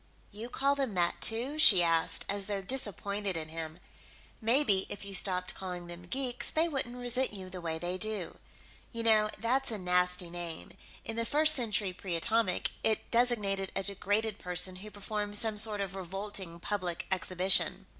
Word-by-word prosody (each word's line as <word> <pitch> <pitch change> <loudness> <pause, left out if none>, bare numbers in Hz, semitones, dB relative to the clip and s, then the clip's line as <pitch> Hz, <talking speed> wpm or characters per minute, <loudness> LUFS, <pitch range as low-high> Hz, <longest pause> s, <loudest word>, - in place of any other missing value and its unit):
"You 220 +4 -8
call 275 +2 +1
them 270 -7 -3
that, 175 -1 0
too?" 250 +7 +2
she 190 - +8
asked, 165 -1 +4
as 200 -1 -2
though 205 -1 -2
disappointed 200 -4 -1
in 155 -1 -5
him. 160 0 -6 0.6
"Maybe 225 -4 +3
if 200 - -6
you 200 - -7
stopped 180 -1 0
calling 180 -2 -6
them 175 0 -9
geeks, 250 +2 0
they 320 +2 +1
wouldn't 265 -6 -3
resent 245 0 +1
you 185 -1 -9
the 180 -1 -7
way 165 -1 -3
they 175 +3 -3
do. 215 -5 -3 0.5
You 230 -1 -4
know, 215 -2 +4
that's 255 +5 0
a 220 - -2
nasty 180 -1 +1
name; 170 -2 -7 0.3
in 225 - -4
the 230 - 0
First 305 +6 +4
Century 215 -8 0
Pre 180 -1 -5
Atomic, 220 +2 0
it 220 - 0
designated 210 -6 +2
a - - -1
degraded 205 +2 -1
person 180 +1 -2
who 210 +3 -10
performed 205 0 -4
some 215 -1 0
sort 210 -1 +5
of 195 -1 -4
revolting 190 -1 -6
public 180 -3 -3
exhibition...." 185 0 +2
200 Hz, 175 wpm, -30 LUFS, 180-230 Hz, 0.6 s, she